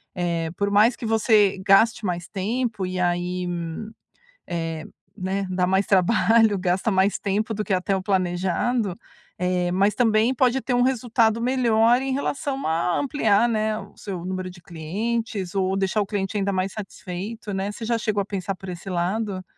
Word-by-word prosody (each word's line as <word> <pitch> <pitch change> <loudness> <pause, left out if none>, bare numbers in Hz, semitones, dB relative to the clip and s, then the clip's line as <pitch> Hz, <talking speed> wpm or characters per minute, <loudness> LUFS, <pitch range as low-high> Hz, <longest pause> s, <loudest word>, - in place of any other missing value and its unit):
eh, 170 -2 -1
por 200 0 0
mais 215 +4 +4
que - - -7
você 220 -3 +3
gaste 215 +3 +4
mais 175 -2 -2
tempo 215 +1 -2
e 185 0 -3
aí, 180 +1 -1 1.0
eh, 165 -2 -3 0.3
né, 195 0 -2
dá 180 -1 0
mais 190 +1 +2
trabalho, 215 +2 +4
gasta 185 +4 0
mais 190 +1 +2
tempo 210 +3 -1
do 215 - -2
que 205 - -2
até 190 +1 +1
o 190 - -3
planejado, 190 +3 0 0.4
eh, 180 0 0
mas 195 +2 +2
também 225 +2 +3
pode 255 0 +2
ter 250 -1 -2
um 245 - +3
resultado 235 -3 +2
melhor 240 -1 +3
em 270 0 -2
relação 275 0 -2
a 170 +2 +1
ampliar, 240 -6 +2
né, 215 -1 0
o 205 -2 -12
seu 185 -4 -6
número 185 0 -4
de 180 -1 -14
clientes 195 +4 -3
ou 190 0 +1
deixar 195 +2 +1
o 200 - -4
cliente 200 0 -3
ainda 200 -1 0
mais 190 0 -1
satisfeito, 205 +2 -6
né, 195 +1 -2
você 225 +2 -7
já 235 +1 +1
chegou 215 -2 0
a 195 - -2
pensar 195 -1 -3
por 190 0 -10
esse 180 +2 -7
lado? 185 +2 -1
200 Hz, 175 wpm, -24 LUFS, 185-225 Hz, 1.0 s, mais